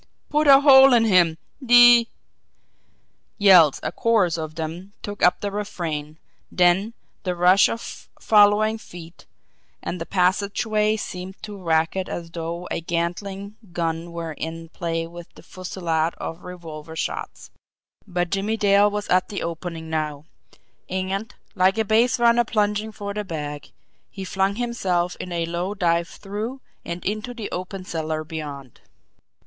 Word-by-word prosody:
Put 300 Hz, 0 st, +2 dB
a 275 Hz, 0 st, +8 dB
hole 270 Hz, -2 st, +8 dB
in 230 Hz, -2 st, +5 dB
him, 175 Hz, -6 st, +4 dB, 0.3 s
de 240 Hz, -1 st, +7 dB, 0.6 s
" -, -, -44 dB
Yells, 170 Hz, -7 st, +7 dB
a -, -, -2 dB
chorus 215 Hz, -8 st, +2 dB
of 155 Hz, -2 st, -5 dB
them, 170 Hz, +5 st, -6 dB
took 205 Hz, 0 st, -6 dB
up 180 Hz, -, +4 dB
the 205 Hz, -, -2 dB
refrain 160 Hz, -7 st, -4 dB, 0.3 s
then 185 Hz, +6 st, +2 dB, 0.3 s
the 180 Hz, -2 st, -2 dB
rush 180 Hz, +3 st, +5 dB
of 230 Hz, -, -7 dB
following 215 Hz, +1 st, +4 dB
feet 170 Hz, -4 st, -13 dB, 0.5 s
and 175 Hz, -, -5 dB
the 165 Hz, -, -5 dB
passageway 205 Hz, +3 st, +1 dB
seemed 185 Hz, -2 st, -6 dB
to 210 Hz, -1 st, -7 dB
racket 165 Hz, 0 st, 0 dB
as 170 Hz, -1 st, -6 dB
though 170 Hz, +1 st, -5 dB
a -, -, -2 dB
Gatling 190 Hz, +5 st, -4 dB, 0.2 s
gun 165 Hz, 0 st, -2 dB
were 170 Hz, -1 st, -5 dB
in 165 Hz, +2 st, -6 dB
play 165 Hz, -1 st, -3 dB
with 170 Hz, 0 st, -11 dB
the -, -, -15 dB
fusillade 170 Hz, -3 st, -2 dB
of 165 Hz, +2 st, -7 dB
revolver 160 Hz, -3 st, -9 dB
shots. -, -, -5 dB, 0.6 s
But 175 Hz, -2 st, -2 dB
Jimmie 200 Hz, +3 st, -1 dB
Dale 205 Hz, 0 st, +4 dB
was 210 Hz, 0 st, -4 dB
at 185 Hz, 0 st, +2 dB
the 200 Hz, -, -4 dB
opening 165 Hz, -1 st, -5 dB
now 150 Hz, -2 st, -3 dB, 0.6 s
and, 190 Hz, +5 st, -3 dB, 0.2 s
like 190 Hz, +3 st, +2 dB
a 220 Hz, -, +1 dB
base 230 Hz, +4 st, +3 dB
runner 235 Hz, 0 st, +4 dB
plunging 210 Hz, -1 st, -1 dB
for 200 Hz, -1 st, -6 dB
the 210 Hz, 0 st, -3 dB
bag, 150 Hz, -5 st, -6 dB, 0.4 s
he 195 Hz, -, -8 dB
flung 190 Hz, +1 st, 0 dB
himself 190 Hz, -7 st, -1 dB
in 180 Hz, -, -6 dB
a 170 Hz, -1 st, -1 dB
low 175 Hz, +4 st, -3 dB
dive 170 Hz, -3 st, +1 dB
through 215 Hz, +9 st, -6 dB, 0.2 s
and 170 Hz, +1 st, -6 dB
into 215 Hz, +4 st, -3 dB
the 225 Hz, -3 st, -6 dB
open 185 Hz, +1 st, -5 dB
cellar 155 Hz, -2 st, -3 dB
beyond. 145 Hz, -5 st, -8 dB
185 Hz, 150 wpm, -23 LUFS, 165-210 Hz, 0.6 s, a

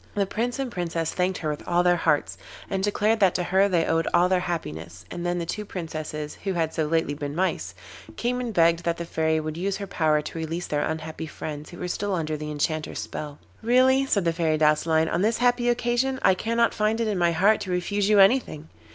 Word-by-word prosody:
The 200 Hz, -1 st, +2 dB
Prince 235 Hz, +5 st, -2 dB
and 270 Hz, -3 st, -3 dB
Princess 165 Hz, -4 st, -2 dB
thanked 185 Hz, 0 st, 0 dB
her 155 Hz, -, -3 dB
with 150 Hz, -, -5 dB
all 175 Hz, 0 st, +2 dB
their 175 Hz, 0 st, +4 dB
hearts, 150 Hz, -3 st, +1 dB, 0.4 s
and 195 Hz, -, 0 dB
declared 210 Hz, +2 st, +1 dB
that 195 Hz, -3 st, +4 dB
to 180 Hz, -, 0 dB
her 190 Hz, +3 st, +3 dB
they 170 Hz, -3 st, +2 dB
owed 165 Hz, 0 st, +1 dB
all 175 Hz, +1 st, +4 dB
their 185 Hz, -1 st, +3 dB
happiness, 85 Hz, -, -5 dB
and 175 Hz, -, -5 dB
then 175 Hz, 0 st, -1 dB
the 170 Hz, -, -2 dB
two 210 Hz, +5 st, -4 dB
Princesses, 155 Hz, -5 st, -6 dB
who 195 Hz, -1 st, -1 dB
had 165 Hz, -2 st, -1 dB
so 155 Hz, -2 st, -1 dB
lately 160 Hz, -2 st, 0 dB
been 145 Hz, 0 st, -5 dB
Mice, 165 Hz, -, -1 dB, 0.4 s
came 250 Hz, -, -1 dB
and 240 Hz, -2 st, -3 dB
begged 170 Hz, -3 st, +3 dB
that 170 Hz, 0 st, -1 dB
the 170 Hz, -, -4 dB
Fairy 160 Hz, -1 st, 0 dB
would 155 Hz, 0 st, -5 dB
use 195 Hz, +2 st, -1 dB
her 200 Hz, -, -5 dB
power 155 Hz, -5 st, +1 dB
to 165 Hz, -, -6 dB
release 165 Hz, +2 st, -3 dB
their 145 Hz, -1 st, -1 dB
unhappy 160 Hz, 0 st, -4 dB
friends 150 Hz, -1 st, -7 dB
who 175 Hz, -, -11 dB
were 180 Hz, -, -4 dB
still 200 Hz, +2 st, -2 dB
under 155 Hz, -2 st, -2 dB
the 150 Hz, 0 st, -5 dB
Enchanter's 155 Hz, +1 st, -2 dB
spell. 150 Hz, -1 st, -6 dB, 0.2 s
'Really,' 260 Hz, +3 st, +4 dB
said 200 Hz, -8 st, +1 dB
the 165 Hz, -, +2 dB
Fairy 160 Hz, -2 st, +1 dB
Douceline, 160 Hz, +1 st, +3 dB
'on 170 Hz, -, 0 dB
this 220 Hz, +3 st, +2 dB
happy 245 Hz, 0 st, +2 dB
occasion 240 Hz, +2 st, +1 dB
I 190 Hz, -, +6 dB
cannot 230 Hz, +4 st, +1 dB
find 215 Hz, +1 st, 0 dB
it 230 Hz, -, 0 dB
in 205 Hz, -4 st, -1 dB
my 170 Hz, -1 st, +3 dB
heart 200 Hz, +6 st, +4 dB
to 190 Hz, -, -5 dB
refuse 195 Hz, +3 st, 0 dB
you 210 Hz, -, +5 dB
anything. 195 Hz, -, +3 dB
175 Hz, 230 wpm, -25 LUFS, 160-205 Hz, 0.4 s, I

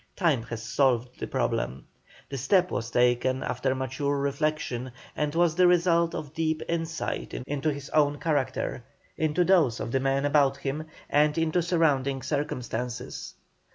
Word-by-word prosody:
Time 160 Hz, -, +2 dB
has 115 Hz, -1 st, -6 dB
solved 125 Hz, 0 st, +1 dB
the -, -, -3 dB
problem. 65 Hz, -, -2 dB, 0.4 s
The 140 Hz, -, -5 dB
step 180 Hz, +7 st, +3 dB
was 115 Hz, -1 st, -2 dB
taken 125 Hz, +2 st, +2 dB
after 130 Hz, -1 st, -1 dB
mature 130 Hz, +2 st, -1 dB
reflection, 140 Hz, -3 st, -2 dB, 0.2 s
and 150 Hz, 0 st, -1 dB
was 170 Hz, -1 st, +3 dB
the 180 Hz, +2 st, +5 dB
result 170 Hz, -1 st, +3 dB
of 155 Hz, -3 st, -6 dB
deep 160 Hz, -1 st, -1 dB
insight 165 Hz, -1 st, -3 dB
into 145 Hz, +4 st, -2 dB
his 145 Hz, 0 st, -7 dB
own 145 Hz, -1 st, +3 dB
character, 135 Hz, -4 st, -1 dB, 0.3 s
into 155 Hz, +2 st, +1 dB
those 170 Hz, -10 st, +3 dB
of -, -, -4 dB
the 135 Hz, -, +2 dB
men 135 Hz, +1 st, +1 dB
about 140 Hz, -2 st, +3 dB
him, 140 Hz, +3 st, -4 dB, 0.2 s
and 150 Hz, +1 st, +3 dB
into 165 Hz, +2 st, +2 dB
surrounding 145 Hz, -6 st, +1 dB
circumstances. 125 Hz, -2 st, -4 dB
145 Hz, 150 wpm, -27 LUFS, 130-160 Hz, 0.4 s, the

